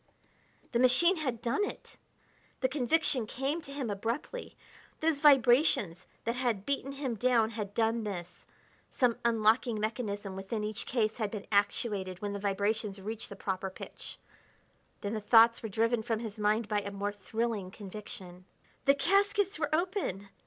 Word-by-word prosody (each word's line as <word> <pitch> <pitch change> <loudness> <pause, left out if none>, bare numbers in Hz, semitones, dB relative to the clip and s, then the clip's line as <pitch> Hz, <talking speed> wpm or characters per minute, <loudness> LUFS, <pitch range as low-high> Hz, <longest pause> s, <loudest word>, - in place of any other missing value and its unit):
The 235 - +1
machine 260 +9 +5
had 255 -7 -3
done 240 - +1
it! - - -6 0.7
The 260 - +3
conviction 265 -2 +1
came 275 +8 -2
to 275 - -10
him 275 -6 -3
abruptly. 230 - -4 0.4
Those 315 -2 +1
vibrations 250 - +4 0.2
that 230 - 0
had 240 -6 -1
beaten 275 0 -2
him 270 -3 -3
down 230 0 +2
had 210 -3 -5
done 225 0 +1
this: 180 -4 -6 0.4
some 245 -2 +1
unlocking 225 0 +3
mechanism 205 -3 -3
within 195 +3 -4
each 210 0 -4
case 220 -3 0
had 215 -3 -1
been 205 -1 -6
actuated 200 -2 0
when 205 -1 -3
the 200 - -4
vibrations 200 +1 -1
reached 215 +3 -6
the 200 - -8
proper 190 -1 -3
pitch. 185 - -9 0.8
Then 205 +1 -3
the 215 - -2
thoughts 230 +2 +6
were 225 - -4
driven 230 +3 +1
from 225 0 -1
his 220 -1 -6
mind 210 +1 +2
by 210 0 +1
a 200 - -5
more 200 +1 -3
thrilling 210 -1 -3
conviction: 190 -2 -9 0.4
The 275 0 +6
caskets 395 +3 +2
were 295 -2 0
open! 315 - -1
225 Hz, 160 wpm, -31 LUFS, 205-255 Hz, 0.8 s, thoughts